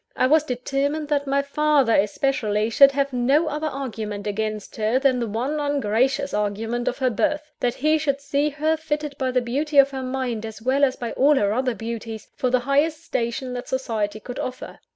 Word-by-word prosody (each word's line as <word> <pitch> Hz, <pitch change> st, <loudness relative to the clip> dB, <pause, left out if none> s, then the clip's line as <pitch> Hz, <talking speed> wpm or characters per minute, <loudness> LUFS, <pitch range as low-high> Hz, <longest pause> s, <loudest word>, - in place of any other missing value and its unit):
I -, -, +2 dB
was 305 Hz, +3 st, +4 dB
determined 280 Hz, +3 st, -2 dB
that 285 Hz, -1 st, 0 dB
my 280 Hz, +1 st, +1 dB
father, 280 Hz, -4 st, +2 dB
especially, 215 Hz, 0 st, +1 dB
should 275 Hz, +4 st, +7 dB
have 280 Hz, -1 st, 0 dB
no 270 Hz, +6 st, +3 dB
other 305 Hz, +1 st, -2 dB
argument 220 Hz, -8 st, -5 dB
against 215 Hz, 0 st, -3 dB
her 220 Hz, +3 st, +1 dB
than 265 Hz, -2 st, +2 dB
the 235 Hz, -, -1 dB
one 250 Hz, +8 st, -2 dB
ungracious 275 Hz, -1 st, 0 dB
argument 225 Hz, +4 st, -2 dB
of 250 Hz, -, 0 dB
her 260 Hz, -2 st, +1 dB
birth 300 Hz, +7 st, -1 dB
that 245 Hz, -1 st, 0 dB
he 310 Hz, +3 st, +2 dB
should 280 Hz, -2 st, 0 dB
see 280 Hz, +1 st, 0 dB
her, 305 Hz, +2 st, 0 dB
fitted 300 Hz, -2 st, -3 dB
by 260 Hz, -1 st, 0 dB
the 250 Hz, 0 st, +1 dB
beauty 285 Hz, +5 st, -2 dB
of 275 Hz, 0 st, +7 dB
her 265 Hz, -1 st, -4 dB
mind, 255 Hz, -3 st, -3 dB
as 220 Hz, -1 st, -7 dB
well 260 Hz, +5 st, +1 dB
as 265 Hz, -2 st, +3 dB
by 235 Hz, -2 st, -5 dB
all 290 Hz, +3 st, +4 dB
her 205 Hz, -6 st, +2 dB
other 255 Hz, 0 st, 0 dB
beauties, 225 Hz, -1 st, -6 dB
for 255 Hz, -, 0 dB
the 250 Hz, 0 st, +2 dB
highest 295 Hz, +5 st, +1 dB
station 240 Hz, +2 st, -2 dB
that 245 Hz, 0 st, -5 dB
society 220 Hz, -5 st, -2 dB
could 245 Hz, +3 st, -7 dB
offer. 255 Hz, 0 st, -6 dB
260 Hz, 200 wpm, -23 LUFS, 230-285 Hz, -, should